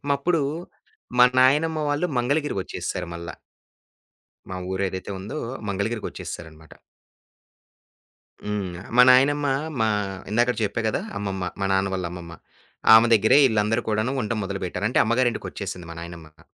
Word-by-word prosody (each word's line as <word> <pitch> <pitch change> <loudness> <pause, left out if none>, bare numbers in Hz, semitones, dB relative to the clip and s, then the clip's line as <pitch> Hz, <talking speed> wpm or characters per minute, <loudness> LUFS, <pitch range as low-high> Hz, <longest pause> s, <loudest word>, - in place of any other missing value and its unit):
అప్పుడు 165 +3 0 0.8
మా 125 - +9
నాయనమ్మ 150 +5 +4
వాళ్ళు 145 +4 0
మంగళగిరి 145 +5 0
వచ్చేసారు 90 -1 -5
మళ్ళ. 85 0 -7 1.2
మా 95 - -5
ఊరేదైతే 95 0 -3
ఉందో! 100 +10 -6 0.3
మంగళగిరికొచ్చేసారనమాట. 95 -6 -5 1.7
హ్మ్. 105 -2 -2 0.3
మా - - +10
నాయనమ్మ 145 +3 +4 0.3
మా 110 - +3 0.4
ఇందాకడ 120 +2 +2
చెప్పా 105 +2 -1
గదా! - - -1 0.2
అమ్మమ్మ, 95 -3 -3
మా 95 - 0
నాన్న 95 0 +1
వాళ్ళ 95 -2 -2
అమ్మమ్మ. 85 -2 -9 0.6
ఆమె 110 +1 +8
దగ్గరే 110 +5 +5
ఈళ్ళందరూ 110 0 +1
కూడాను 110 +3 0
ఉండటం 110 0 -2
మొదలుపెట్టారు. 95 0 -4
అంటే - - +2
అమ్మగారింటికొచ్చేసింది 110 -6 -2
మా 85 - -8
నాయనమ్మిక. 85 -2 -11
105 Hz, 120 wpm, -24 LUFS, 95-125 Hz, 1.7 s, మా